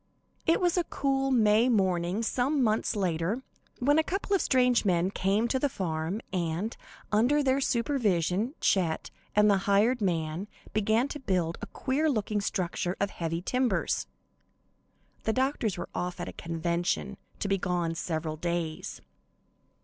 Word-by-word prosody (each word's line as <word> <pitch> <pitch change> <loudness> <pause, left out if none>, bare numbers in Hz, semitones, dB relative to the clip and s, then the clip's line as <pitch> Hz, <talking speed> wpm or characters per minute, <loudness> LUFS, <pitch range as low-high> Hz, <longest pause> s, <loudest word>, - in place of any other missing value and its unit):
It 330 - +4
was 355 -1 +2
a - - +2
cool, 270 -2 0
May 225 -1 +4
morning, 190 -2 +1
some 265 +4 +1
months 220 0 +1
later, 185 +5 -1 0.3
when 290 +5 +3
a - - +3
couple 395 +3 -1
of 385 - +2
strange 250 -2 +3
men 180 -2 +2
came 200 +4 +1
to 260 - +1
the 285 - +1
farm, 170 -1 -3
and, 175 +5 -1 0.4
under 245 +8 +3
their 270 0 +2
supervision, 230 - +1
Chet 170 -5 +1 0.2
and 210 0 +6
the 200 -1 +5
hired 220 +5 +3
man 170 0 -1 0.3
began 220 +4 +2
to 295 - -5
build 180 - -1
a - - -5
queer 295 +4 0
looking 215 -5 0
structure 180 -1 -2
of 200 0 0
heavy 165 0 -3
timbers. 250 +3 0 1.1
(The 220 - 0
doctors 255 -6 0
were 175 - -5
off 180 0 -3
at - - -4
a - - -6
convention, 170 +4 -2 0.2
to - - -2
be 195 -1 +1
gone 175 -2 -1
several 160 -1 -3
days.) 170 -1 -3
205 Hz, 150 wpm, -29 LUFS, 175-255 Hz, 1.1 s, and